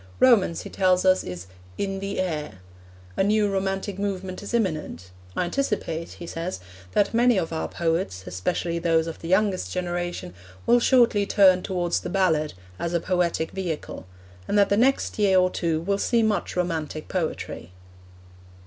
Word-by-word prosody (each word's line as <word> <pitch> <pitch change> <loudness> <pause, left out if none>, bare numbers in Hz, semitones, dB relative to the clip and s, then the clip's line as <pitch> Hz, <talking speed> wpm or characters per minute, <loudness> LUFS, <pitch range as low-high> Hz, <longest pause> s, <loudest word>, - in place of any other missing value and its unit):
Romance, 220 -10 +4
he - - -8
tells 185 -1 +2
us, 185 0 +4
is 90 0 -7 0.3
'in 195 -1 -2
the 195 0 -4
air.' 150 - -3 0.6
A - - +2
new 210 +1 +3
romantic 195 0 -2
movement 190 -2 -3
is 205 - -7
imminent; 155 - -2 0.2
'I - - +1
anticipate,' 175 -6 -2
he 175 - -9
says, 170 - -4 0.3
'that 205 - +2
many 240 -1 +4
of 165 -3 -1
our 160 - -2
poets, 165 - -2
especially 170 - -2
those 165 -1 +2
of 165 - -6
the 165 - -7
youngest 190 +1 +1
generation, 175 - -3 0.3
will 240 +1 +5
shortly 235 -5 +4
turn 185 -3 +5
towards 175 -3 -1
the - - -6
"ballad" 160 - +1 0.2
as 170 0 -2
a - - +3
poetic 170 -2 0
vehicle: 170 - -5 0.4
and - - +1
that 200 -1 +5
the 200 - +3
next 255 +1 +2
year 195 -2 +4
or 185 0 +4
two 165 -2 0
will 200 +3 0
see 235 +1 +2
much 210 -4 0
romantic 160 -4 -2
poetry.' 160 - -4
185 Hz, 165 wpm, -25 LUFS, 165-200 Hz, 0.6 s, will